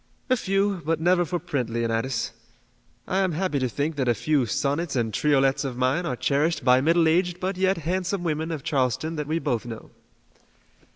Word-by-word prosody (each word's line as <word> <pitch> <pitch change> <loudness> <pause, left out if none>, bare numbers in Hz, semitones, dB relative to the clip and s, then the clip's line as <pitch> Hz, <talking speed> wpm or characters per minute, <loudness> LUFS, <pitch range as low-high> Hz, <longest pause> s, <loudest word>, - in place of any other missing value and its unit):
"A - - +6
few, 195 -3 0
but 160 +1 0
never 175 +2 +3
for 175 +3 -2
print, 145 -9 -3
Leonidas. 115 +1 -1 0.8
I 190 - 0
am 190 -3 +1
happy 165 -3 -1
to 130 -1 0
think 145 +5 -2
that 130 -3 0
a 120 - +3
few 140 +1 +1
sonnets 140 - -1
and 115 -3 0
triolets 135 -2 +2
of 130 -3 -4
mine 130 +8 +1
are 125 - -1
cherished 150 +3 0
by 125 0 +5
middle 165 +3 +3
aged 175 +2 +1
but 190 +1 -2
yet 190 +1 +1
handsome 180 +3 -2
women 160 -1 -1
of 155 -4 -4
Charleston 145 +2 0
that 150 -1 -3
we 160 +2 0
both 130 -9 -1
know." 115 -2 -8
150 Hz, 190 wpm, -25 LUFS, 130-175 Hz, 0.8 s, A